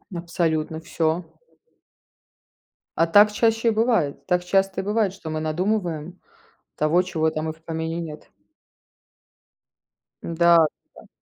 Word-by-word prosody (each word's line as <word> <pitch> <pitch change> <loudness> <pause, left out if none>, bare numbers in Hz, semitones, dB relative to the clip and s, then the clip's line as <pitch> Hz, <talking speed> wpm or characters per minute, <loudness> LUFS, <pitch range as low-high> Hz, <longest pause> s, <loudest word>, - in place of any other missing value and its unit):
Абсолютно 165 -2 -2
всё. 165 +1 -1 1.7
А 165 - +4
так 205 +5 +6
чаще 225 +2 +1
и - - +5
бывает, 220 - 0
так 180 -1 +1
часто 195 +1 +1
и - - -9
бывает, 205 -1 0
что 195 -5 -9
мы 155 0 -3
надумываем 175 0 -2 0.6
того, 155 +4 +2
чего 165 -4 -1
там 155 0 -2
и - - -4
в 160 +1 -22
помине 160 +1 -4
нет. 155 -2 -9 1.9
Да, 170 +1 +4 0.4
да. - - -15
170 Hz, 125 wpm, -23 LUFS, 160-195 Hz, 1.9 s, так